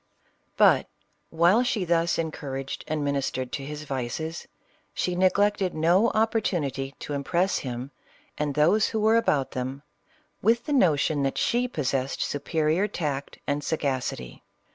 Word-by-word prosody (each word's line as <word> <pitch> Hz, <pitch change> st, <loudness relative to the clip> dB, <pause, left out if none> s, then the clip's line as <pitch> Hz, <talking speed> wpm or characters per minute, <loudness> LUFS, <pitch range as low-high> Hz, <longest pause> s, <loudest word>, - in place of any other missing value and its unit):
But -, -, +5 dB, 0.4 s
while 175 Hz, +8 st, +4 dB
she 225 Hz, -6 st, 0 dB
thus 170 Hz, 0 st, +2 dB
encouraged 140 Hz, -4 st, -4 dB
and 150 Hz, -2 st, -1 dB
ministered 135 Hz, -2 st, -2 dB
to 140 Hz, -, -4 dB
his 150 Hz, +2 st, -6 dB
vices, 140 Hz, +4 st, -4 dB, 0.5 s
she 180 Hz, -, -1 dB
neglected 190 Hz, +1 st, +2 dB
no 175 Hz, +8 st, +4 dB
opportunity 170 Hz, -, 0 dB
to 145 Hz, -, -5 dB
impress 170 Hz, +7 st, 0 dB
him, 125 Hz, +1 st, -5 dB, 0.4 s
and 145 Hz, -2 st, -2 dB
those 175 Hz, +9 st, +4 dB
who 220 Hz, -, -2 dB
were 220 Hz, +1 st, +4 dB
about 150 Hz, -12 st, +2 dB
them, 130 Hz, +2 st, -4 dB, 0.6 s
with 230 Hz, +2 st, +2 dB
the 295 Hz, -, -1 dB
notion 155 Hz, -, +3 dB
that 135 Hz, -1 st, -1 dB
she 245 Hz, +1 st, +1 dB
possessed 135 Hz, -, -2 dB
superior 155 Hz, +6 st, 0 dB
tact 145 Hz, -8 st, -4 dB
and 145 Hz, +1 st, -1 dB
sagacity. 130 Hz, -, -3 dB
155 Hz, 135 wpm, -26 LUFS, 140-190 Hz, 0.6 s, But